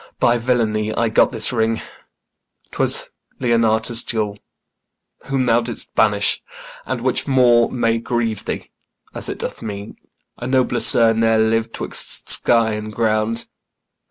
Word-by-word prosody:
By 120 0 +2
villainy 110 -3 0
I 115 -1 +1
got 110 - +3
this 115 0 +1
ring; 115 -1 0 0.9
'twas - - -1 0.3
Leonatus' 115 -1 +1
jewel, 105 -3 -3 0.9
Whom 135 -1 -1
thou 120 0 +3
didst 120 -1 -8
banish; 105 -2 +2 0.5
and 130 -1 -3
which 130 +2 -1
more 125 -3 +4
may 115 -2 0
grieve 115 -3 -3
thee, - - -5 0.4
As - - +5
it - - -5
doth - - -6
me 100 -1 -7 0.5
a 120 - -5
nobler 130 -2 +1
sir 115 0 +5
ne'er 115 0 +2
liv'd 110 +1 0
'Twixt - - -3
sky 115 -2 +4
and 105 0 -5
ground. 110 +1 -1
115 Hz, 135 wpm, -19 LUFS, 110-120 Hz, 0.9 s, As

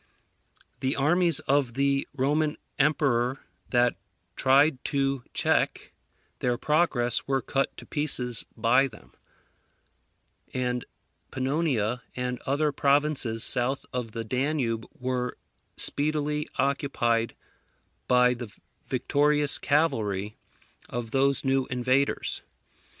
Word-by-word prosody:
The 130 +1 0
armies 165 +2 +2
of 135 -4 +1
the 140 0 +1
Roman 150 +3 +1 0.2
emperor 135 -3 +2 0.3
that 120 -5 +2 0.4
tried 135 +1 +4
to 135 -2 0
check - - +1 0.5
their 125 -1 0
progress 150 -5 +2
were 135 0 +2
cut 135 0 -1
to - - -10
pieces 130 -6 0
by 120 +4 +4
them; 110 -5 -16 1.4
and 125 -1 -1 0.4
Panonia 130 -4 0
and 125 0 -3
other 145 +2 +1
provinces 140 -5 +2
south 125 +2 +1
of 120 -4 -3
the 115 -1 -3
Danube 125 -1 -1
were 125 -1 -2 0.4
speedily 150 0 0
occupied 120 -5 0 0.7
by 125 0 +5
the 120 -3 -7 0.4
victorious 145 +3 +1
cavalry 110 -9 0 0.5
of 120 -2 -4
these 135 +2 +2
new 135 0 +2
invaders. 130 +2 0
135 Hz, 100 wpm, -27 LUFS, 120-145 Hz, 1.4 s, by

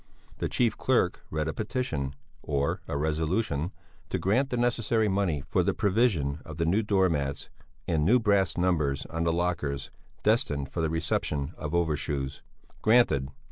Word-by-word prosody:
The - - -1
chief 115 -4 +2
clerk - - +1
read 75 0 -1
a 80 - -1
petition, 105 - -2 0.3
or 70 -1 -1
a 70 - -2
resolution, 80 +2 0 0.4
to - - 0
grant 125 +9 +1
the 125 - -1
necessary 115 -2 +1
money 95 -8 0
for - - +2
the - - 0
provision 95 - +1
of 80 -1 -9
new 85 +6 +2
door 100 -3 +3
mats 70 -4 -2 0.4
and 80 -3 +1
new 115 +10 +5
brass 100 -6 +2
numbers 80 -7 +1
on 80 0 -1
the 85 - +3
lockers 80 -5 -1 0.3
destined 70 -2 +1
for 85 - -2
the 80 - +1
reception 80 -2 -1
of 75 +3 -4
overshoes. 75 -4 -1 0.4
Granted! 95 - +4
80 Hz, 155 wpm, -28 LUFS, 75-100 Hz, 0.4 s, new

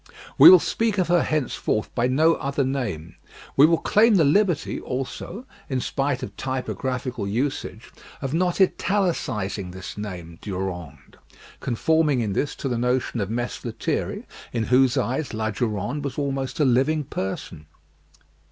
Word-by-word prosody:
We 335 - +12
will 370 - +11
speak 225 - -1
of 180 -2 +1
her 175 -1 +4
henceforth 135 -7 -1
by 120 0 +1
no 155 +6 +4
other 140 -2 -1
name; 110 - -3 0.4
we 145 +3 +7
will 165 0 +3
claim 220 +5 +4
the 170 - +5
liberty, 175 +2 +2
also, 135 - -5 0.2
in 130 -2 0
spite 135 +1 -1
of - - -7
typographical 130 -3 -3
usage, 125 +8 -3 0.3
of 135 0 -4
not 175 +2 +1
italicising 130 - 0
this 95 +2 -8
name 85 -5 -7
Durande; 90 -6 -6 0.4
conforming 150 +3 +1
in 105 -4 -1
this 145 - -1
to - - -4
the 120 -3 -1
notion 125 -1 0
of 100 - -2
Mess 120 +2 -3
Lethierry, 115 -2 -3 0.3
in 115 -2 -1
whose 130 +2 +3
eyes 130 +2 -1
La 110 0 -1
Durande 110 +5 -2
was 140 -2 -4
almost 135 -1 -2
a 150 - +4
living 135 +5 +2
person. 95 - -5
130 Hz, 150 wpm, -24 LUFS, 110-150 Hz, 0.4 s, We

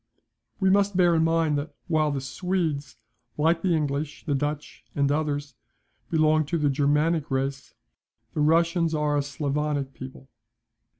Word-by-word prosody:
We 190 -2 +3
must 200 -1 +2
bear 175 -2 +5
in 160 -1 +3
mind, 165 -2 +2
that 145 - -7
while 155 -2 +2
the 140 -2 -2
Swedes, 160 -1 -2 0.4
like 165 +2 +2
the 180 -2 +2
English, 145 0 -3
the 150 - 0
Dutch, 145 +2 -3
and 140 -1 +2
others, 145 -2 -1 0.6
belong 155 -1 +3
to 170 - 0
the 150 -3 +1
Germanic 150 +3 +1
race, 135 0 -3 0.6
the 150 - -1
Russians 165 +1 +2
are 150 -1 +1
a 145 - +2
Sclavonic 145 -1 -2
people. 130 0 -10
150 Hz, 145 wpm, -26 LUFS, 145-165 Hz, 0.6 s, bear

